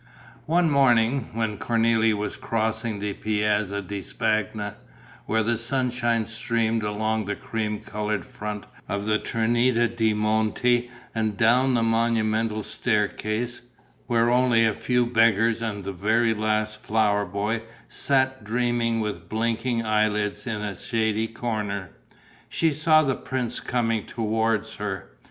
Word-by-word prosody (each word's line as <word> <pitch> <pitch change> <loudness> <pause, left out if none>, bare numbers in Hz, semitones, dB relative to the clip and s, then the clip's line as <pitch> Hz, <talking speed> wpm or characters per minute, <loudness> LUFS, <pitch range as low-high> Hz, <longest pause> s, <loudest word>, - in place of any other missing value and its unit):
One 170 +2 +3
morning, 125 -2 +3
when 110 -2 -2
Cornélie 115 -1 +2
was 105 0 -3
crossing 110 -1 -2
the 100 0 -3
Piazza 105 -1 0
di 100 +1 -5
Spagna, 105 0 -1 0.5
where 110 0 +2
the 115 +1 0
sunshine 120 -2 0
streamed 115 0 -1
along 110 +1 -1
the 105 - -2
cream 105 -2 -3
coloured 105 0 -3
front 105 -5 -6 0.3
of 100 0 -2
the 110 0 +2
Trinita 120 +1 +2
de' 110 -2 0
Monti 110 +3 +1 0.2
and 110 -2 -1
down 125 +3 +4
the 115 - +2
monumental 115 -1 +1
staircase, 110 +2 -1 0.5
where 120 -1 +3
only 120 -2 +4
a 110 - +2
few 125 +2 +1
beggars 115 -1 +3
and 105 -3 -3
the 100 +1 -4
very 110 +5 +2
last 110 0 -1
flower 105 -3 +2
boy 100 +4 -2 0.3
sat 130 -3 +1
dreaming 115 0 0
with 85 -6 -4
blinking 115 +1 -1
eye 110 0 +3
lids 105 +3 -2
in 105 -3 -3
a 105 -2 -3
shady 110 +2 0
corner, 105 -5 -3 0.6
she 165 -2 +1
saw 155 +1 +4
the 135 -2 +1
prince 130 -2 -3
coming 115 -3 -1
towards 110 -1 -1
her. 95 -8 -5
110 Hz, 135 wpm, -25 LUFS, 105-120 Hz, 0.6 s, down